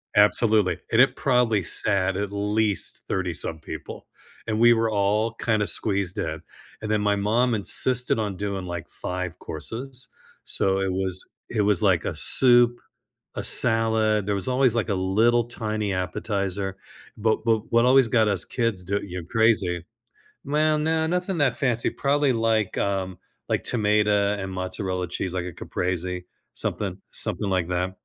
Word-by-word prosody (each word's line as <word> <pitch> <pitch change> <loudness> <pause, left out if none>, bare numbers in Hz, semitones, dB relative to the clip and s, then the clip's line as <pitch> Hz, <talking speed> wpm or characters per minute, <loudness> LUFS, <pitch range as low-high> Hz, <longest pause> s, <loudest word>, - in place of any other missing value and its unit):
Absolutely, 105 -3 +4
and 115 - +5
it 130 -1 +3
probably 125 -6 +2
sat, 95 +2 +2
at 100 0 -3
least, 105 0 -1
thirty-some 85 -3 -2
people, - - -8 0.4
and 110 -1 -1
we 120 +1 +6
were 115 -1 +2
all, 105 +2 +1
kinda 110 -2 0
squeezed 100 -4 -1
in, - - -4 0.4
and 110 - -3
then 105 -1 +1
my 105 0 +2
mom 115 +4 +1
insisted 125 +4 +1
on 105 -3 -3
doing, 100 -2 -4
like, 85 -2 -6
5 90 -1 -5
courses, 125 - -7 0.3
so, 95 0 +1
it 95 -1 -1
was 95 -1 -3 0.2
it 110 - 0
was, 105 -3 +2
like, - - +2
a - - -2
soup, 120 -1 +5 0.6
a - - -3
salad, 110 -2 +2
there 100 - 0
was 100 +2 -3
always, 130 -2 +2
like, 115 -2 -1
a 100 - 0
little, 110 +6 +2
tiny 110 -3 -3
appetizer, 95 +1 -3 0.4
but 110 +1 0
but 110 -2 0
what 115 0 +4
always 130 -1 +5
got 115 -2 +3
us 100 -3 0
kids 115 -6 -2
d 100 +3 -1
you 90 -2 -6
crazy 95 -4 +1 0.6
Well, 155 +2 +2
no, 160 +1 0
nothing 180 +1 -1
that 145 -2 +2
fancy, 120 -4 0
probably 140 -1 +1
like, 115 -3 0
um 95 -2 -2 0.3
like, - - 0
tomato 105 -2 +2
and 95 -1 -5
mozzarella 95 0 -3
cheese, 90 +1 -4
like 90 -1 -3
a 90 - -6
Caprese 90 +1 -3 0.3
something - - -2
something 100 - -1
like 90 -3 0
that, 90 +1 -1
105 Hz, 160 wpm, -24 LUFS, 95-115 Hz, 0.6 s, we